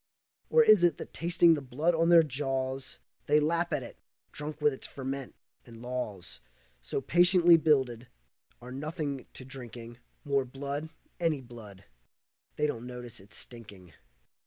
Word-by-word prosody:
Or 470 - +6
is 210 - +6
it 175 - +4
that - - -9
tasting 170 0 +4
the 150 - -1
blood 145 +6 0
on 165 +1 +2
their 170 -1 +8
jaws 135 -2 -3 0.3
They 150 +1 +5
lap 170 +3 0
at 145 -4 -1
it, 120 - -10 0.3
drunk 150 +1 -6
with 150 -1 +3
its 130 - -6
ferment, 135 -1 -6 0.3
and 115 -2 -13
laws 105 - -4 0.4
So - - -3
patiently 175 +2 +6
builded, 130 -7 +2 0.6
are 125 - -9
nothing 145 0 -4
to 130 - -10
drinking 120 -2 -9 0.3
More 140 -2 +2
blood, 140 +4 -5 0.3
any 165 -4 +1
blood. 110 -6 -12 0.7
They 150 - +1
don't 125 -5 -3
notice 125 -2 -8
its 95 +2 -9
stinking. 100 -8 -10
135 Hz, 150 wpm, -30 LUFS, 125-155 Hz, 0.7 s, their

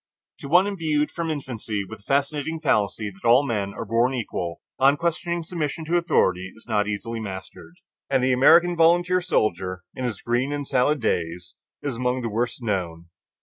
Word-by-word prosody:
To - - -7
one 175 +6 +5
imbued 160 -7 0
from 170 -1 -3
infancy 115 -8 -3
with 110 +1 -9
the 100 - -27
fascinating 145 +3 0
fallacy 105 -7 0
that 95 +4 -6
all 125 +5 +6
men 105 -6 -2
are 115 - -5
born 115 +4 +1
equal, 90 -8 -4 0.2
unquestioning 165 +5 +1
submission 160 -1 -3
to 165 +3 0
authority 95 - +1
is 110 - -14
not 105 -3 +1
easily 115 +2 -4
mastered, 95 - -8 0.3
and 135 -2 +2
the 130 0 +3
American 170 +7 +6
volunteer 175 +2 +4
soldier 95 - -1
in 130 - -6
his 120 -6 -2
"green 120 +4 0
and 145 -1 -3
salad 135 +2 +2
days" 85 -4 -2 0.3
is 140 -5 -3
among 125 0 -1
the 115 - -1
worst 120 +3 -2
known. 85 -6 -3
125 Hz, 175 wpm, -24 LUFS, 105-155 Hz, 0.3 s, all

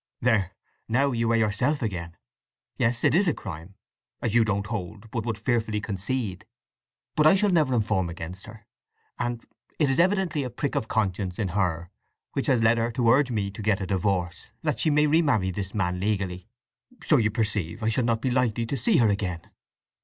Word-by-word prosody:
"There—now 115 +4 0
you 115 -1 0
are - - +3
yourself 115 +6 +1
again. 85 -5 -4 0.6
Yes, 115 +1 0
it - - +4
is 190 +4 +3
a 165 - +2
crime—as 100 +4 -8
you 120 -1 +5
don't 100 -2 -1
hold, 105 0 -6
but 115 -1 -3
would 110 -3 -1
fearfully 110 -2 0
concede. 105 0 -3 0.7
But 155 0 +5
I 160 - +7
shall 200 +1 +2
never 150 -7 +3
inform 105 -5 +1
against 90 +4 -8
her! 110 -1 -12 0.5
And 120 -1 -3 0.3
it 145 -4 +2
is 135 - 0
evidently 185 -4 +2
a 125 - -3
prick 135 +4 -3
of 110 - -1
conscience 95 -4 -1
in 100 -4 -1
her 90 -2 -1 0.4
that - - -2
has 125 -4 +3
led 115 +1 +4
her 115 +1 0
to 115 -1 +3
urge 135 +2 +4
me 100 -4 -1
to 100 - -8
get 105 -2 +1
a 95 - -3
divorce, 90 -2 -1
that - - -1
she - - +2
may 150 0 +4
remarry 145 - +2
this 95 +2 -5
man 90 -3 0
legally. 95 -2 -2 0.6
So 155 - +4
you 110 -4 +2
perceive 105 -5 -1
I 110 - +2
shall 115 +3 +1
not 115 -1 +1
be 130 - +1
likely 120 -2 +1
to 135 +4 -3
see 220 - +2
her 115 - +4
again." 95 -5 -2
110 Hz, 190 wpm, -26 LUFS, 95-125 Hz, 0.7 s, I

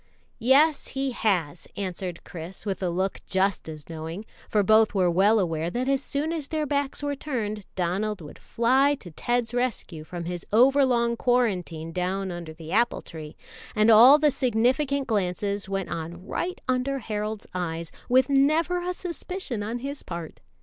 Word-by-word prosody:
"Yes, 280 +6 +4
he 270 0 -2
has," 180 -9 -1
answered 185 -2 -4
Chris, 170 +4 -8
with 195 -2 -3
a 185 - 0
look 190 +3 -1
just 190 -3 0
as 155 -2 -9
knowing, 165 +5 -6 0.2
for 210 -2 +3
both 215 +1 +4
were 180 -3 +3
well 200 +6 +4
aware 165 -4 0
that 245 +7 -2
as 275 0 +2
soon 300 +4 -2
as 310 -4 -3
their 310 -1 -1
backs 285 0 -1
were 285 0 0
turned 220 -8 -4
Donald 195 +4 -1
would 150 -3 -11
fly 260 +5 +2
to 185 -10 -12
Ted's 240 +7 -1
rescue 240 -10 -2
from 175 +2 -6
his 175 0 -4
overlong 245 0 +4
quarantine 190 -11 0
down 185 +2 -2
under 170 -2 -6
the 160 0 -10
apple 235 +3 +2
tree, 155 -2 -9 0.4
and 215 +1 +5
all 245 +7 +9
the 300 -1 +3
significant 260 +4 +1
glances 200 -2 -1
went 195 -1 -2
on 170 +3 -6
right 360 - -3
under 255 +2 0
Harold's 215 -3 -4
eyes, 170 -2 -3 0.2
with 255 +1 +5
never 310 +6 +2
a 360 +1 -2
suspicion 355 - -5
on 220 +4 -3
his 280 +3 -5
part. 170 -2 -7
215 Hz, 165 wpm, -26 LUFS, 180-265 Hz, 0.4 s, all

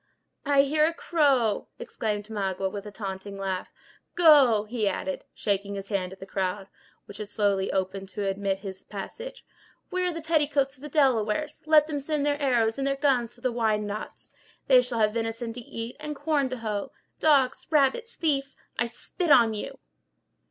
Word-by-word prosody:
"I 280 -1 +5
hear 305 +2 +3
a 330 - -2
crow!" 275 - +2
exclaimed 210 -2 -3
Magua, 195 -2 -2
with 205 +1 -6
a - - -7
taunting 200 -1 -6
laugh. 190 -2 -3 0.4
"Go!" 285 -11 +6
he 215 -1 -1
added, 190 -1 -3
shaking 200 0 -2
his 195 0 -7
hand 190 -3 -1
at 190 - -11
the - - -8
crowd, 190 0 -3 0.4
which 205 - -10
had 210 - -5
slowly 200 -2 0
opened 190 0 -2
to 200 +1 -3
admit 195 0 -1
his 190 -1 -7
passage. 470 - -8 0.5
"Where 365 0 0
are - - 0
the 330 -1 -6
petticoats 295 -4 +1
of 265 - -21
the 300 - -7
Delawares! 270 0 +1
Let 310 -1 +6
them 300 -2 -3
send 290 0 -1
their 290 0 0
arrows 235 -4 +2
and 275 - 0
their 275 - +1
guns 265 -5 +1
to 240 - -16
the 255 -1 0
Wyandots; 215 -2 -2 0.3
they 255 -2 +7
shall 245 -1 -3
have 215 -1 +3
venison 230 0 -3
to 245 - -7
eat, 230 +1 -7
and 300 0 -5
corn 290 -2 0
to 255 - -4
hoe. 215 -3 -3 0.3
Dogs, 275 -5 +3
rabbits, 305 - +2
thieves—I 275 -6 -2
spit 340 +8 -4
on 235 -6 +6
you!" 210 - -6
235 Hz, 180 wpm, -27 LUFS, 200-285 Hz, 0.5 s, they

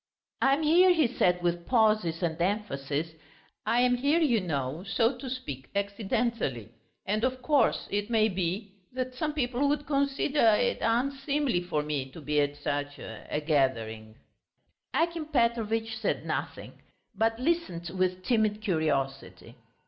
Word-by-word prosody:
"I 270 0 +5
am 310 - -3
here," 350 +4 +6
he 325 -4 +4
said, 180 -7 +1
with 175 0 -1
pauses 215 -8 +2
and 165 -1 -1
emphasis, 165 -6 -1 0.6
"I 240 - +3
am 250 0 +4
here, 285 +6 +2
you 245 -10 +3
know, 145 -2 -3
so 225 +5 +1
to 255 +2 -7
speak, 145 - -6
accidentally, 200 - -1 0.4
and, 215 +3 -1
of 255 0 -1
course, 290 +1 +2
it 205 +2 -1
may 220 -2 +4
be... 190 +1 -3 0.2
that 255 0 -3
some 300 +4 -2
people 265 -1 0
would 290 0 0
consider... 275 -4 +2
it - - 0
unseemly 270 -1 0
for 165 -4 -2
me 145 -3 -3
to - - -9
be 150 0 +1
at 145 0 -1
such... 145 0 -3
a 150 - -6
gathering." 115 -7 0 0.8
Akim 335 -2 0
Petrovitch 225 -4 0
said 220 -1 -2
nothing, - - -5 0.3
but 225 0 +1
listened 250 - -1
with 185 0 0
timid 215 -3 +1
curiosity. 155 -9 -2
215 Hz, 145 wpm, -28 LUFS, 160-255 Hz, 0.8 s, here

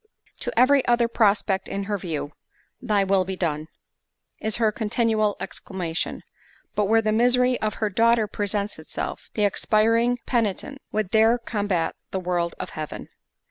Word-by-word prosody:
To - - -2
every 265 +2 +5
other 240 -1 +3
prospect 205 -4 +1
in 200 - -3
her 205 +1 -2
view, 155 -5 -4 0.5
"Thy 210 -5 +2
will 195 -1 +3
be 190 +1 -4
done" 155 -4 -2 0.7
is 220 -1 -2
her 225 -2 +2
continual 215 -1 +1
exclamation; 175 -3 -4 0.5
but 210 - +1
where 225 +2 +3
the 215 - +1
misery 250 +2 +3
of 215 -1 -1
her 215 -2 -1
daughter 230 +2 +3
presents 205 -1 -3
itself, 155 - -6
the 210 - +2
expiring 225 +4 +2
penitent 240 +4 -1
would 215 -3 -1
there 225 +2 +5
combat 205 -8 -1 0.2
the 190 - -2
will 175 -1 -1
of - - -5
Heaven. 155 -1 -6
215 Hz, 150 wpm, -24 LUFS, 190-230 Hz, 0.7 s, every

